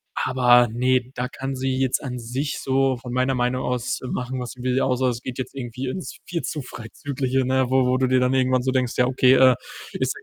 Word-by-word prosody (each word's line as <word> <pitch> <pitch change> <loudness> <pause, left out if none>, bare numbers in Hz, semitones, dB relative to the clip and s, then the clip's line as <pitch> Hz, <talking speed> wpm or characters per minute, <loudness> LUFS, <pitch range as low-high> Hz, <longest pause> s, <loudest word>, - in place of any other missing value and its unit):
aber 125 -2 +4
ne, 125 +2 +1
da 125 0 -2
kann 135 0 -5
sie 130 0 -1
jetzt 130 -1 0
an 125 -3 -4
sich 130 +5 -3
so 135 -1 +1
von 125 -1 -8
meiner 130 +1 +1
Meinung 125 +1 0
aus 125 0 -2
machen, 125 0 -3
was 125 -1 -5
sie 125 - -12
will. 130 0 +1
Außer 130 0 +1
es 120 -1 -4
geht 130 0 -6
jetzt 130 - -5
irgendwie 125 0 -5
ins 180 +8 -6
viel 170 -1 -3
zu 150 - -3
Freizügliche, 130 +2 -3
ne, 130 0 +2
wo 130 -1 +3
wo 125 0 +2
du 130 - +2
dir 130 0 +3
dann 125 0 +2
irgendwann 130 -1 +2
so 130 - 0
denkst: 130 -2 0
„Ja, 125 - +3
okay, 130 0 +4
äh, 130 -1 +6 0.4
ist - - -1
sie - - -12
130 Hz, 235 wpm, -23 LUFS, 125-130 Hz, 0.4 s, äh